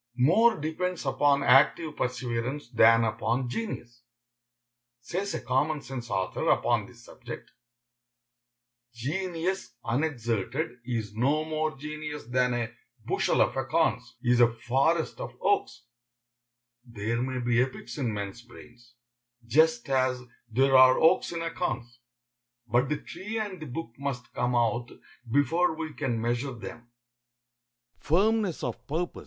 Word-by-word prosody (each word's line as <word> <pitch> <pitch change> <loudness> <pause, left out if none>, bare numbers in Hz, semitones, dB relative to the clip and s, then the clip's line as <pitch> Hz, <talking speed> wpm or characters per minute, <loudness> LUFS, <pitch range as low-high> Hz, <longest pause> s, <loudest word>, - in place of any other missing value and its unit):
More 185 - +4
depends 160 +3 -3
upon 140 +1 +3
active 145 +4 +4
perseverance 125 +2 -3
than 115 0 +6
upon 120 +3 -1
genius. 120 - -5 1.0
Says 180 +12 -3
a - - -3
common 140 +4 0
sense 125 -3 -6
author 95 -1 -1
upon - - +2
this - - -16
subject: - - -10 1.4
"Genius 175 +4 -3
unexerted 120 - -1
is 115 -4 -3
no 140 +8 +1
more 155 -1 -2
genius 150 +1 -6
than 125 +1 +1
a 120 -2 -2 0.3
bushel - - +1
of - - +2
acorns - - 0
is 120 0 +3
a 120 -1 +6
forest 135 - 0
of - - -7
oaks." 405 - 0 1.0
There 115 -1 -3
may 130 0 -2
be 120 0 +2
epics 130 +3 -4
in 125 -5 0
men's 100 +2 -5
brains, 120 0 -16 0.5
just 150 0 +3
as 130 -1 +1 0.3
there 135 +4 +3
are 130 0 +8
oaks 170 +3 +4
in 165 -1 -3
acorns, 120 -8 -3 0.7
but 120 +3 +1
the 150 - 0
tree 205 +9 -6
and 205 -5 -4
the 155 - -6
book 135 +1 -5
must 135 -3 -4
come 125 0 0
out 120 0 +1 0.4
before 160 +6 +2
we 160 -1 -5
can 120 -5 -2
measure 120 +4 -1
them. 120 0 -9
130 Hz, 125 wpm, -28 LUFS, 120-155 Hz, 1.4 s, are